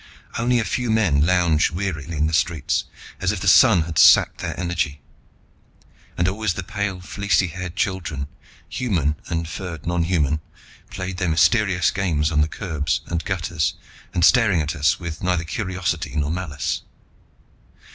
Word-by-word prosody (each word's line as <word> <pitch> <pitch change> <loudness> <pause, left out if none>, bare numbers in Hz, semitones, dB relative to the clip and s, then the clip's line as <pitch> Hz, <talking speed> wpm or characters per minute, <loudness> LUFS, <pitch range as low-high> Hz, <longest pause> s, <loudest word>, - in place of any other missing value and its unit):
Only 120 +2 +1
a 115 - +1
few 120 +5 -2
men 95 -11 +3
lounged 85 -2 +3
wearily 85 -3 -4
in 75 - +2
the 80 - -1
streets, 80 -1 0 0.3
as 95 0 +1
if 105 - -3
the 95 - -3
sun 95 -3 +6
had 80 -1 -2
sapped - - +6
their - - -4
energy. 85 -5 -2 1.2
And 85 - +2
always 100 0 -1
the 95 - -4
pale 100 -2 -3
fleecy 95 -1 0
haired 90 +1 -6
children, 95 - -2 0.4
human 85 - -1
and 85 -1 -2
furred 85 -1 -7
nonhuman, 85 -4 0 0.5
played 95 -1 -5
their 90 -1 0
mysterious 90 +3 +3
games 80 -5 0
on 75 -1 +2
the 75 - +2
curbs 80 -4 -2
and 85 -1 -3
gutters 85 -3 -1 0.4
and 85 -1 +3
staring 110 -7 +4
at 75 +1 -2
us 75 +1 +2
with 85 -3 -6
neither 90 -2 0
curiosity 90 -1 -3
nor 75 0 0
malice. 85 -5 -3
90 Hz, 155 wpm, -22 LUFS, 80-95 Hz, 1.2 s, sun